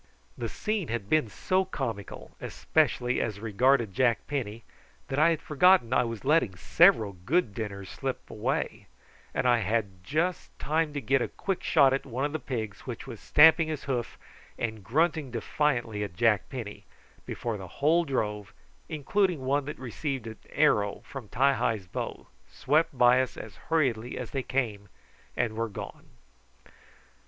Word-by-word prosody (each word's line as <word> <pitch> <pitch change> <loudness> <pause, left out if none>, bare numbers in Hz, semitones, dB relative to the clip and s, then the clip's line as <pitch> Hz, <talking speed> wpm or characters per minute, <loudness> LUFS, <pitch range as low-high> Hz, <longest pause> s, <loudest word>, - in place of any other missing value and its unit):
The - - -4
scene 210 -6 -2
had 110 -3 -4
been 155 -8 +3
so 185 - 0
comical, 120 - -5
especially 125 -5 +1
as 105 -3 -3
regarded 115 0 +2
Jack 120 +2 +2
Penny, 115 -6 -4 0.5
that 135 - -1
I 155 +2 +6
had 165 -2 -1
forgotten 150 -4 +4
that - - +4
I - - +3
was 115 +1 -6
letting 145 - +3
several 110 - +4
good 110 - 0
dinners 100 -3 -5
slip - - -5
away, - - -3 0.4
and 125 - 0
I 120 -1 +4
had 100 -3 -2
just 165 - -2
time 155 +1 0
to 145 - -3
get 135 0 +2
a - - 0
quick 195 -2 -3
shot 140 -4 +4
at 135 - -1
one 130 +3 -2
of 145 - -2
the 155 - -3
pigs 110 -7 -5
which 120 -3 -6
was 120 -5 -8
stamping 160 +1 +6
his 155 -3 -4
hoof 125 -4 -3 0.4
and 110 -3 -4
grunting 155 - +1
defiantly 120 -3 -1
at 95 -4 -6
Jack 105 0 +2
Penny, 115 -6 -7 0.4
before 115 -3 -3
the 95 -2 -8
whole 160 +5 +3
drove, 105 - -3 0.3
including 160 0 0
one 140 +1 +1
that 150 - -5
had - - -12
received 130 0 -4
an 110 -1 -8
arrow 105 -9 +2
from 135 -6 -8
Ti 135 +6 +3
hi's 110 -7 -1
bow, 90 - -5 0.2
swept 145 +1 +1
by 125 +1 +6
us 130 - -4
as 105 -4 -9
hurriedly 125 -8 0
as 125 - -6
they 135 - -1
came, 110 -7 -2 0.5
and 110 - 0
were 115 +1 -2
gone. 100 - -9
125 Hz, 165 wpm, -28 LUFS, 110-150 Hz, 0.5 s, I